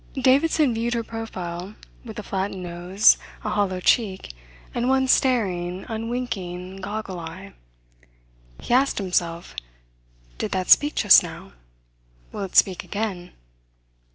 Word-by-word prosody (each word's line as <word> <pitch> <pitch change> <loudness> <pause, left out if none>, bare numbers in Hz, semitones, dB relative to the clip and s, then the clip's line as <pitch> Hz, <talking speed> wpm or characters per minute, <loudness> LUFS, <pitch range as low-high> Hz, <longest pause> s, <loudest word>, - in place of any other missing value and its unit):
Davidson 275 +1 +3
viewed 235 +2 -1
her 230 - -1
profile 190 -4 -6 0.3
with 225 -3 -9
a 215 - -5
flattened 190 -1 -3
nose, 175 +4 +3 0.2
a - - -2
hollow 195 -3 0
cheek, 190 - +1 0.4
and 240 +1 0
one 265 0 +2
staring, 190 -9 +1
unwinking, 220 -6 -4
goggle 195 -1 -5
eye. 170 +4 -9 1.1
He - - -3
asked 270 +2 +3
himself: 175 - -2 0.9
Did - - -2
that 185 -1 -1
speak 295 +1 +6
just - - +7
now? - - -9 0.8
Will - - -6
it 195 -2 -6
speak 185 -2 +4
again? 200 -4 -4
200 Hz, 125 wpm, -23 LUFS, 180-235 Hz, 1.1 s, just